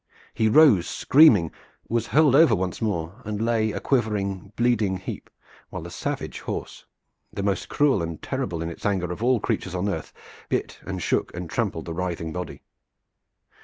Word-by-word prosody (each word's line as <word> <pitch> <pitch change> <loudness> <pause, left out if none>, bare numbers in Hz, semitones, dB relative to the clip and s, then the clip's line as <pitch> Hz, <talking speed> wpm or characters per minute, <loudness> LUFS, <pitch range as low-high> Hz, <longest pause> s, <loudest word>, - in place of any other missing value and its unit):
He 110 -1 +2
rose 130 - +6
screaming, 120 - +5 0.4
was 115 0 -1
hurled 150 0 +4
over 145 -6 +6
once 95 +1 -3
more, 100 0 -3
and 105 -1 -4
lay 110 -1 +1
a - - -4
quivering, 105 -6 -1
bleeding 115 -6 +1
heap, 90 - -7 0.4
while - - -6
the - - -8
savage - - -4
horse, - - -6 0.4
the 100 - -4
most 100 -3 -1
cruel 145 - +2
and 85 -1 -4
terrible 95 -12 -3
in 85 - -3
its - - -11
anger 95 -4 0
of 90 - -6
all 125 0 +3
creatures 95 -2 -2
on 90 +3 -1
earth, 80 -6 -3 0.4
bit - - -2
and 95 -2 -4
shook - - 0
and 90 -2 -6
trampled - - -2
the 85 - -5
writhing 85 -2 -3
body. 90 0 -6
100 Hz, 170 wpm, -24 LUFS, 90-120 Hz, 0.4 s, rose